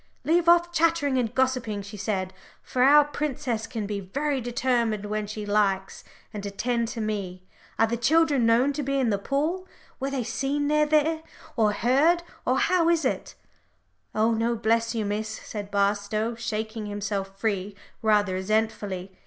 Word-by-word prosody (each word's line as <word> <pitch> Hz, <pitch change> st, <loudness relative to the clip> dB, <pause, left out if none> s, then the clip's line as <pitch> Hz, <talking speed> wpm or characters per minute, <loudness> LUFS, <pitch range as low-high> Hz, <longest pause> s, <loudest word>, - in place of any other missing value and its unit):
"Leave 340 Hz, +1 st, +3 dB
off 345 Hz, 0 st, +5 dB
chattering 325 Hz, -5 st, +2 dB
and 240 Hz, -1 st, -2 dB
gossiping," 255 Hz, -6 st, 0 dB
she 200 Hz, +1 st, -9 dB
said, 190 Hz, -2 st, -2 dB, 0.3 s
for 250 Hz, -, -2 dB
our 290 Hz, +3 st, +7 dB
princess 260 Hz, -6 st, -3 dB
can 225 Hz, -4 st, -4 dB
be 205 Hz, 0 st, -3 dB
very 275 Hz, +8 st, -2 dB
determined 235 Hz, -3 st, 0 dB
when 210 Hz, 0 st, -2 dB
she 210 Hz, 0 st, -5 dB
likes, 200 Hz, -2 st, 0 dB, 0.3 s
"and 205 Hz, -1 st, -5 dB
attend 230 Hz, +4 st, -1 dB
to 235 Hz, 0 st, -6 dB
me. 200 Hz, -4 st, -3 dB, 0.3 s
Are 225 Hz, -, +5 dB
the 235 Hz, +1 st, -2 dB
children 295 Hz, +1 st, +3 dB
known 245 Hz, +5 st, +3 dB
to 295 Hz, -, -3 dB
be 275 Hz, 0 st, -1 dB
in 245 Hz, -4 st, +2 dB
the 200 Hz, -, 0 dB
pool? 310 Hz, -, -1 dB, 0.3 s
Were 270 Hz, -, -2 dB
they 270 Hz, -3 st, -2 dB
seen 275 Hz, +5 st, -1 dB
near 300 Hz, 0 st, +3 dB
there? 310 Hz, +1 st, +2 dB, 0.3 s
or 220 Hz, -3 st, +3 dB
heard? 280 Hz, +11 st, +3 dB, 0.2 s
or -, -, +3 dB
how 345 Hz, -2 st, +3 dB
is 330 Hz, -4 st, +2 dB
it?" -, -, -2 dB, 0.8 s
"Oh 220 Hz, +2 st, +3 dB
no, 230 Hz, +1 st, +1 dB
bless 230 Hz, +1 st, +1 dB
you, 220 Hz, -2 st, -1 dB
Miss," 210 Hz, +2 st, -2 dB
said 210 Hz, -2 st, -7 dB
Barstow, 205 Hz, +2 st, 0 dB
shaking 220 Hz, -1 st, -4 dB
himself 200 Hz, -1 st, -4 dB
free 200 Hz, -2 st, -2 dB, 0.3 s
rather 210 Hz, -3 st, +3 dB
resentfully. 195 Hz, -1 st, -1 dB
230 Hz, 165 wpm, -26 LUFS, 205-275 Hz, 0.8 s, our